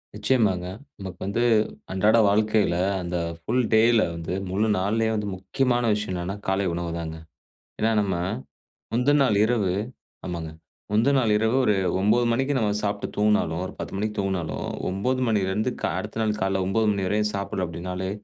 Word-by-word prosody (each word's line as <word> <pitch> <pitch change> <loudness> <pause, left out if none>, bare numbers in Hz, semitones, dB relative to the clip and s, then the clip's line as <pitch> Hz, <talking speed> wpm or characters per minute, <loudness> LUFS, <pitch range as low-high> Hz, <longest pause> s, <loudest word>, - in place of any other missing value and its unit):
நிச்சயமாங்க. 105 -5 +1 0.3
நமக்கு 95 -2 -7
வந்து 105 +5 0 0.5
அன்றாட 105 +4 +3
வாழ்க்கைல 105 -3 +2 0.2
அந்த 90 0 -3 0.2
ஃபுல் 125 +9 0
டேல 115 0 +5
வந்து 85 +1 -4 0.2
முழு 105 +4 +1
நாள்லையே 110 +4 +1
வந்து 105 -1 -2
முக்கியமான 120 +6 0
விஷயம் 105 -2 -2
என்னான்னா 90 +2 -3
காலை 95 +1 +1
உணவு 85 0 -3
தாங்க. 80 -1 -5 0.6
ஏன்னா 110 - +3
நம்ம 100 -2 0 0.8
முந்தநாள் 130 -2 +3
இரவு 110 -5 +1 0.5
ஆமாங்க. 85 -3 -4 0.4
முந்தநாள் 120 +2 +3
இரவு 110 +3 +1
ஒரு 105 - +3 0.2
9 110 +5 +3
மணிக்கு 135 +4 +1
நம்ம 110 -4 +1
சாப்ட்டு 100 0 -1
தூங்குனாலும், 105 -5 +2
ஒரு - - -7
10 - - -5
மணிக்கு 105 +1 -2
தூங்குனாலும், 95 -5 -2 0.2
9 125 +8 -1
மணிலேருந்து 105 +2 +1
க - - -11 0.2
அடுத்த 110 +1 -6
நாள் 105 -1 0
காலைல 95 0 +1
9 110 +4 +1
மணி 100 -2 -1
வரையும் 105 +2 +1
சாப்டல 100 -1 -2
அப்டினாலே, 90 +2 -4
105 Hz, 150 wpm, -25 LUFS, 95-110 Hz, 0.8 s, டேல